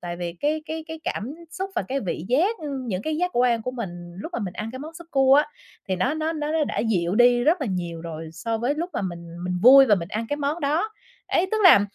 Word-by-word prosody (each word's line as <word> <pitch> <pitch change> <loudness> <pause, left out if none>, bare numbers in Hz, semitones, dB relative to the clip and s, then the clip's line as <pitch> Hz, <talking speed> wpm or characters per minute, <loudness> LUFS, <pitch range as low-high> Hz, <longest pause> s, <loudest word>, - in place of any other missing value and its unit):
tại 175 -1 -5
vì 175 -1 -4
cái 305 +1 0
cái 320 0 -5
cái 320 0 -7
cảm 245 +8 -3 0.2
xúc 380 +3 -4
và 355 - 0
cái 275 +1 -1
vị 175 -5 -4
giác, 360 - +2
ưm, 275 -5 -5
những 190 -4 -2
cái 310 +3 -2
giác 360 +2 0
quan 240 -2 +3
của 250 - -3
mình 175 -8 -7
lúc 330 - -7
mà - - -2
mình 195 -5 -4
ăn 215 +1 -4
cái 260 - -6
món 315 +4 -8
súp 340 0 -11
cua 270 -1 +5
á, 295 +2 +4 0.4
thì 185 - 0
nó 260 +11 +1
nó 315 +1 -1
nó 305 -1 -3
nó 320 -1 +2
đã - - -4
dịu 185 -6 +1
đi 245 +1 +5
rất 320 +3 +3
là 275 - -1
nhiều 175 -4 -3
rồi 160 -1 -7
so 225 +6 -3
với 245 +6 0
lúc 340 +4 -3
mà - - -2
mình 170 -1 -6
mình 180 0 -1
vui 270 +2 +9
và 215 - +6
mình 170 -3 -4
ăn 220 +3 -3
cái 290 - -1
món 295 +3 -2
đó. 305 +9 +1 0.4
Ấy, 355 - +2
tức 440 - +2
là 345 - +9
255 Hz, 275 wpm, -24 LUFS, 185-310 Hz, 0.4 s, vui